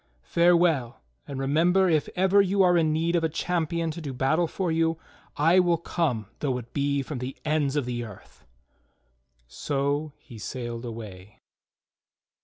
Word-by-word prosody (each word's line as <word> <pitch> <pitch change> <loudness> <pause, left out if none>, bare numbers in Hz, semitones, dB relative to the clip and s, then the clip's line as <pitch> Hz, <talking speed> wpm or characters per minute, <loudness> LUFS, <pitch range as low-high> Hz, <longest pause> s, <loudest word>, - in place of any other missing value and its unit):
Farewell, 170 - +2 0.2
and 140 -2 -5
remember 170 +8 +3
if 155 -4 +1
ever 190 +2 +4
you 195 0 +2
are 180 -1 +4
in 160 -2 +3
need 165 +2 0
of 170 - +1
a 160 - +2
champion 170 0 -1
to 170 +2 -7
do 140 -4 -5
battle 145 +7 +1
for 180 +1 -2
you, 165 0 +1 0.4
I 165 +5 +5
will 175 -2 +3
come 150 -10 -1
though 130 -4 -1
it 120 -1 -10
be 140 0 0
from 135 -1 -6
the 125 +2 -6
ends 150 -2 +1
of 145 -4 0
the 120 -1 -3
earth." 110 -4 -13 1.0
So 140 - -2
he 115 -5 -13
sailed 120 +1 -5
away. 105 -4 -9
150 Hz, 160 wpm, -26 LUFS, 130-170 Hz, 1.0 s, I